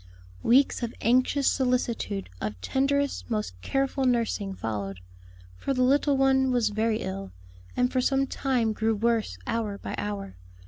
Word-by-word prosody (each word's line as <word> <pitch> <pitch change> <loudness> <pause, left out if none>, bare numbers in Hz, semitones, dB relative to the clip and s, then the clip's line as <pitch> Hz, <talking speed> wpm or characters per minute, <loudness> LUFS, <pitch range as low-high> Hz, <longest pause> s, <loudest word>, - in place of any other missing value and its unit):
Weeks 265 +3 +4
of 235 -1 -3
anxious 255 +4 +3
solicitude, 245 - 0
of 105 -3 -4
tenderest, 280 - 0
most 215 - -2
careful 270 - 0
nursing, 230 -5 0
followed; 100 - -4 0.6
for 270 - -2
the 255 - +2
little 280 +2 +3
one 265 0 +3
was 240 -4 +2
very 220 +1 0
ill, 95 0 -5 0.4
and 250 0 +2
for 255 - +1
some 270 +1 +2
time 250 -5 0
grew 220 +1 +1
worse 225 - 0
hour 215 -3 -2
by - - -6
hour. 100 -2 -4
235 Hz, 145 wpm, -27 LUFS, 200-265 Hz, 0.6 s, Weeks